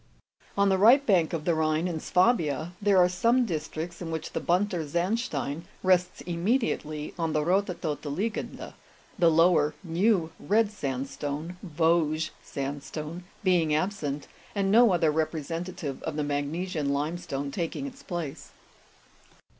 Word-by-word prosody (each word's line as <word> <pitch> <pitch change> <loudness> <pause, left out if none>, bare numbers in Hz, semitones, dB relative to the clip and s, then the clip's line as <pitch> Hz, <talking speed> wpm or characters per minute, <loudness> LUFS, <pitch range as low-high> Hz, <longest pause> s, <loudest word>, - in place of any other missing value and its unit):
On 200 0 +4
the 190 -1 +2
right 250 +7 +7
bank 180 - +3
of 160 -3 -3
the 170 - +3
Rhine, 160 +1 +1
in 165 -3 -3
Swabia, 175 - +2
there 200 -1 +4
are 180 -1 +7
some 235 +7 +2
dis 160 -6 -3
tricts 170 +2 -6
in 170 - -4
which 160 -1 -4
the - - -2
bunter 180 +1 +1
sandstein 170 - -2 0.2
rests 180 -1 +2
immediately 170 - -1
on 165 -2 0
the 150 -1 +1
rothe 195 +4 +2
todte 155 -2 -3
liegende, 210 +9 -3 0.5
the 170 -2 +6
lower 165 -2 +4
new 175 0 +2
red 215 +1 +2
sandstone 140 +1 -4
(Vosges 160 -2 +1
sandstone) 150 +4 -5 0.2
being 170 -5 +3
absent, 155 -5 -2 0.3
and 195 -1 +1
no 230 0 +7
other 165 -3 +3
representative 160 -1 -3
of 160 - -4
the 150 - -1
magnesian 145 +2 -2
lime 150 +5 -1
stone 140 -3 -4
taking 170 - -3
its 270 0 -8
place. 170 -6 -6
170 Hz, 145 wpm, -28 LUFS, 150-185 Hz, 0.5 s, right